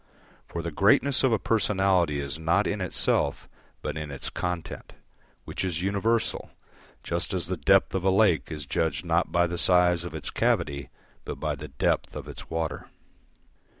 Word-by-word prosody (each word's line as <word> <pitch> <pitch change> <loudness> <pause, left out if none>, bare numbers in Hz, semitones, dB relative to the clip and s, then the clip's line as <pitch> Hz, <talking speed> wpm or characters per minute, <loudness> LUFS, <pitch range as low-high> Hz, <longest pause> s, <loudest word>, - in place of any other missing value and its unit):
For 85 - -5
the 85 - -3
greatness 125 - +4
of 130 - +4
a 110 - +3
personality 95 -9 +2
is 70 +3 -4
not 85 +6 +2
in 100 0 -2
itself 85 -5 0 0.4
but 75 - -3
in 75 -1 -5
its 70 -2 -5
content, 90 -2 -4 0.5
which - - -4
is 90 -2 -2
universal, 100 +4 0 0.5
just 85 +3 -2
as 90 -4 0
the - - -2
depth - - +3
of 95 -2 -1
a 95 - +3
lake 95 -7 +3
is 75 -2 -5
judged 75 0 -1
not - - +1
by 85 0 +3
the 85 0 -3
size 90 -1 +4
of 85 -2 -7
its 80 - -4
cavity 70 -2 0 0.3
but - - -5
by 75 -1 -2
the 75 +2 -7
depth 70 - -1
of - - -6
its - - -9
water. 80 -1 -3
85 Hz, 175 wpm, -27 LUFS, 75-95 Hz, 0.5 s, greatness